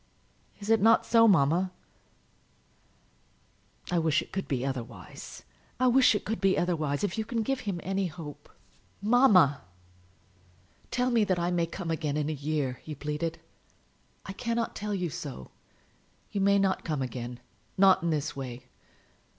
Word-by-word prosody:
Is 205 Hz, +2 st, -3 dB
it 225 Hz, -2 st, +4 dB
not 225 Hz, +2 st, +5 dB
so, 230 Hz, -1 st, +5 dB
mamma?" 175 Hz, 0 st, +3 dB, 2.2 s
"I 175 Hz, -, +2 dB
wish 160 Hz, -2 st, +2 dB
it -, -, -19 dB
could 195 Hz, -, -3 dB
be 130 Hz, -3 st, -1 dB
otherwise; 120 Hz, -7 st, -7 dB, 0.4 s
I 255 Hz, -, +3 dB
wish 250 Hz, -2 st, +5 dB
it -, -, -3 dB
could 220 Hz, +1 st, -3 dB
be 195 Hz, -1 st, +3 dB
otherwise! 155 Hz, -4 st, 0 dB
If 205 Hz, +2 st, -1 dB
you -, -, 0 dB
can 230 Hz, 0 st, -2 dB
give 270 Hz, +4 st, -1 dB
him 180 Hz, -3 st, -2 dB
any 195 Hz, 0 st, -1 dB
hope 150 Hz, -3 st, -10 dB, 0.3 s
" -, -, -36 dB
"Mamma!" 185 Hz, -, +5 dB, 1.3 s
"Tell 250 Hz, 0 st, 0 dB
me 230 Hz, -2 st, +4 dB
that 185 Hz, -2 st, +1 dB
I 175 Hz, +1 st, 0 dB
may 170 Hz, -1 st, +1 dB
come 170 Hz, 0 st, -5 dB
again, 155 Hz, -2 st, -1 dB
in 150 Hz, +1 st, -1 dB
a -, -, -2 dB
year," 145 Hz, -3 st, -2 dB
he 155 Hz, -, -7 dB
pleaded. 150 Hz, +3 st, -4 dB, 0.8 s
"I 195 Hz, -, -6 dB
cannot 230 Hz, +2 st, -2 dB
tell 210 Hz, -1 st, -3 dB
you 180 Hz, -4 st, -2 dB
so. 65 Hz, -, -7 dB, 0.8 s
You 200 Hz, -, -1 dB
may 200 Hz, +1 st, +4 dB
not 195 Hz, -1 st, +1 dB
come 150 Hz, -5 st, -2 dB
again, 120 Hz, -1 st, -6 dB, 0.4 s
not 190 Hz, -1 st, +6 dB
in 170 Hz, -, -1 dB
this 155 Hz, -1 st, -1 dB
way. 125 Hz, -2 st, -7 dB
170 Hz, 160 wpm, -28 LUFS, 145-200 Hz, 2.2 s, not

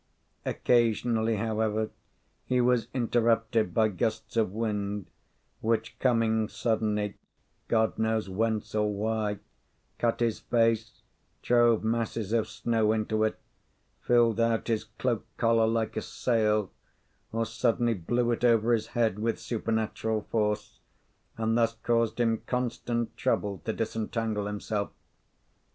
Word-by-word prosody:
Occasionally, 115 Hz, -1 st, +2 dB
however, 110 Hz, 0 st, -1 dB, 0.6 s
he 125 Hz, 0 st, +2 dB
was 120 Hz, -2 st, +3 dB
interrupted 115 Hz, -3 st, +1 dB
by 110 Hz, +4 st, +3 dB
gusts 110 Hz, +4 st, -2 dB
of 110 Hz, -5 st, +2 dB
wind, 105 Hz, -2 st, -2 dB, 0.5 s
which, 115 Hz, 0 st, -1 dB
coming 110 Hz, -3 st, +2 dB
suddenly, 105 Hz, -3 st, -1 dB, 0.5 s
God 110 Hz, -1 st, +1 dB
knows 110 Hz, -2 st, +1 dB
whence 110 Hz, +3 st, -1 dB
or 105 Hz, -1 st, +1 dB
why, 105 Hz, 0 st, -1 dB, 0.6 s
cut 115 Hz, -1 st, +1 dB
his 115 Hz, -2 st, 0 dB
face, 115 Hz, -1 st, 0 dB, 0.4 s
drove 120 Hz, -2 st, +4 dB
masses 115 Hz, -1 st, -1 dB
of 110 Hz, -2 st, +2 dB
snow 110 Hz, -1 st, +1 dB
into 110 Hz, 0 st, 0 dB
it, 110 Hz, -, 0 dB, 0.6 s
filled 120 Hz, -2 st, +3 dB
out 115 Hz, 0 st, +1 dB
his 110 Hz, -2 st, 0 dB
cloak 115 Hz, -3 st, -2 dB
collar 115 Hz, -1 st, +3 dB
like 115 Hz, -1 st, 0 dB
a 110 Hz, -, -1 dB
sail, 110 Hz, -5 st, 0 dB, 0.6 s
or 115 Hz, +1 st, 0 dB
suddenly 115 Hz, +1 st, +1 dB
blew 120 Hz, +6 st, 0 dB
it 120 Hz, -, -2 dB
over 115 Hz, -1 st, +4 dB
his 110 Hz, -1 st, 0 dB
head 110 Hz, -4 st, +2 dB
with 115 Hz, +1 st, -1 dB
supernatural 110 Hz, -1 st, -1 dB
force, 105 Hz, -1 st, -1 dB, 0.6 s
and 115 Hz, 0 st, +1 dB
thus 115 Hz, -1 st, +2 dB
caused 115 Hz, -1 st, +1 dB
him 115 Hz, -2 st, +2 dB
constant 120 Hz, -2 st, -2 dB
trouble 100 Hz, -2 st, 0 dB
to 110 Hz, -, 0 dB
disentangle 110 Hz, -1 st, -2 dB
himself. 105 Hz, 0 st, -2 dB
110 Hz, 125 wpm, -28 LUFS, 110-115 Hz, 0.6 s, drove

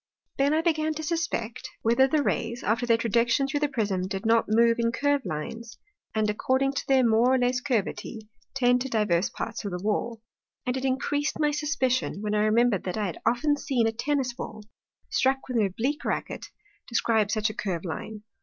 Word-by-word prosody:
Then 280 Hz, +1 st, +3 dB
I 320 Hz, -, +1 dB
began 315 Hz, -2 st, +1 dB
to 315 Hz, -, -5 dB
suspect, 305 Hz, -9 st, -2 dB
whether 235 Hz, +4 st, +4 dB
the 300 Hz, +1 st, +1 dB
Rays, 235 Hz, -2 st, -2 dB
after 230 Hz, +3 st, 0 dB
their 230 Hz, -1 st, +4 dB
Trajection 235 Hz, +4 st, +2 dB
through 290 Hz, +1 st, -1 dB
the 295 Hz, -, +2 dB
Prism, 200 Hz, -8 st, -1 dB
did 195 Hz, +1 st, -5 dB
not 225 Hz, 0 st, +3 dB
move 230 Hz, +2 st, +4 dB
in 230 Hz, 0 st, +2 dB
curve 285 Hz, +3 st, +1 dB
Lines, 220 Hz, +9 st, -5 dB, 0.4 s
and 215 Hz, -1 st, +2 dB
according 260 Hz, +6 st, +1 dB
to -, -, -4 dB
their 265 Hz, -3 st, +4 dB
more 230 Hz, +3 st, +4 dB
or -, -, +3 dB
less 250 Hz, 0 st, +1 dB
Curvity, 225 Hz, -3 st, -2 dB, 0.3 s
tend 245 Hz, -1 st, +3 dB
to 265 Hz, -, -3 dB
divers 210 Hz, -6 st, +1 dB
parts -, -, -5 dB
of 205 Hz, -, -3 dB
the 180 Hz, 0 st, -5 dB
Wall. 220 Hz, +2 st, -1 dB, 0.5 s
And 250 Hz, -, -1 dB
it 265 Hz, 0 st, -3 dB
increas'd 285 Hz, +3 st, -1 dB
my 300 Hz, -1 st, +2 dB
suspicion, 275 Hz, -7 st, 0 dB
when 210 Hz, 0 st, -1 dB
I 210 Hz, 0 st, +2 dB
remember'd 225 Hz, -2 st, +3 dB
that 185 Hz, +3 st, -3 dB
I 210 Hz, -, 0 dB
had 180 Hz, -, -5 dB
often 290 Hz, +5 st, +2 dB
seen 250 Hz, -5 st, 0 dB
a 225 Hz, -, +2 dB
Tennis 255 Hz, +2 st, -1 dB
Ball, 215 Hz, -3 st, -7 dB, 0.5 s
struck 265 Hz, +1 st, +1 dB
with 250 Hz, -2 st, -1 dB
an 210 Hz, -3 st, +3 dB
oblique 255 Hz, -, -2 dB
Racket, -, -, -3 dB, 0.4 s
describe 220 Hz, -3 st, +1 dB
such 215 Hz, 0 st, 0 dB
a -, -, -11 dB
curve 190 Hz, -5 st, -3 dB
Line. 210 Hz, +5 st, -6 dB
235 Hz, 200 wpm, -26 LUFS, 215-270 Hz, 0.5 s, whether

